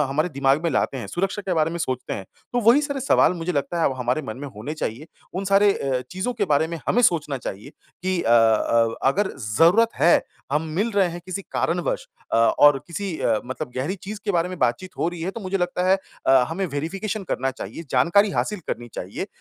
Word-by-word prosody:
हमारे 155 +5 0
दिमाग 140 0 +1
में 170 - +2
लाते 135 0 0
हैं 120 - -5
सुरक्षा 195 +3 -2
के 185 -2 -1
बारे 160 -1 +2
में 170 - -4
सोचते 130 -6 -3
हैं, 95 - -4 0.3
तो 245 - +1
वही 235 +5 +6
सारे 280 -2 -3
सवाल 260 - +4
मुझे 170 +1 -3
लगता 155 +3 -1
है - - +2
अब - - -4
हमारे 125 +4 0
मन 110 -5 -6
में 145 +2 -6
होने 130 +9 -5
चाहिए, 145 0 -4 0.3
उन 190 +2 -2
सारे 200 +1 +4
अ, 135 -6 -1
चीज़ों 190 +7 -2
के 225 -4 -1
बारे 155 -2 +2
में 170 0 -5
हमें 245 - +3
सोचना 155 - +2
चाहिए 105 +2 -7 0.3
कि 185 -1 +1
अ - - -2
अ 115 0 +4 0.2
अगर 205 0 +1
ज़रूरत 165 - +4
है, 170 - +4 0.3
हम 150 +2 +2
मिल 215 +5 +1
रहे 195 -3 +3
हैं 175 +1 -6
किसी 185 +1 -4
कारणवश - - -1 0.3
अ, - - +3
और 135 +5 +5
किसी 180 0 -4
अ, 110 -2 +2
मतलब 130 -1 -5
गहरी 140 +9 -1
चीज़ 210 +2 -6
के 210 - 0
बारे 175 0 +1
में 185 -1 -7
बातचीत 130 +9 0
हो - - +1
रही 175 -1 -7
है 180 - -1
तो 230 - -8
मुझे 195 -1 -2
लगता 180 0 -1
है 190 - +6 0.3
अ, 135 -1 +6
हमें 175 +5 -2
वेरिफ़िकेशन 195 +8 -3
करना 135 - 0
चाहिए, 135 +5 -7
जानकारी 170 +11 +4
हासिल 210 +1 -1
करनी 120 0 -4
चाहिए - - -5
170 Hz, 225 wpm, -23 LUFS, 135-195 Hz, 0.3 s, वही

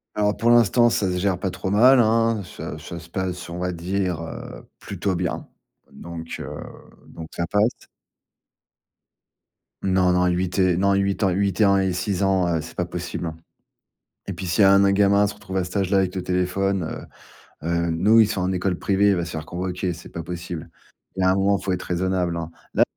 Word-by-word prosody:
Alors 105 0 +1
pour 115 - +1
l'instant, 120 0 +5
ça 105 - 0
se 90 - -2
gère 95 -1 0
pas 95 - -2
trop 95 +1 -4
mal, 125 +6 +6
hein. 115 -1 +3
Ça 90 - -7
ça 85 - -8
se 85 - -14
passe, 90 0 -4
on 85 - -6
va 90 0 -1
dire, 90 0 -2
heu, 80 - -9
plutôt 95 -1 -3
bien. 85 -1 -3 0.4
Donc, 85 -1 -8
heu, - - -6 0.6
donc 80 -1 -9
ça 85 - -2
passe. 105 +4 0 2.0
Non, 95 -1 +2
non, 90 0 +3
8 90 +2 -1
et 95 -2 +4
non 100 +2 +2
8 100 +1 0
ans 95 - +4
et - - 0
8 100 +1 0
et - - +7
ans 100 0 +4
et 95 -1 +1
6 90 +2 -2
ans, 95 -3 +2
heu, 80 - 0
c'est 80 - -11
pas 90 - 0
possible, 90 0 -5
hein 80 - -6 0.9
et - - -4
puis, - - -7
s'il 90 +4 0
y - - +8
a 95 - +7
un 100 - +7
n - - +4
un 100 - +4
gamin 100 0 +4
à - - +4
se 100 - -3
retrouver 95 0 -4
à - - -1
cet 90 +3 -4
âge-là 95 0 +1
avec 95 0 -1
le 95 - -3
téléphone, 90 +1 0 0.8
heu, 85 - -2
heu, 85 0 0
nous, 105 +8 +4
ils 110 - +6
sont 100 -3 -2
en 90 - 0
école 90 -1 -1
privée, 100 +1 +2
il - - +2
va 85 - -1
se 85 - -6
faire 80 -2 -5
convoquer, 90 +1 -3
c'est 85 +1 -12
pas 85 - -6
possible. 85 -1 -6 0.5
Il 95 - -2
y - - +2
a 95 - +4
un - - +2
moment, 100 +1 +2
faut 95 +1 -3
être 90 0 -2
raisonnable, 90 -1 -1
hein. 80 -1 -4 0.2
Là, - - +5
95 Hz, 230 wpm, -23 LUFS, 90-100 Hz, 2.0 s, y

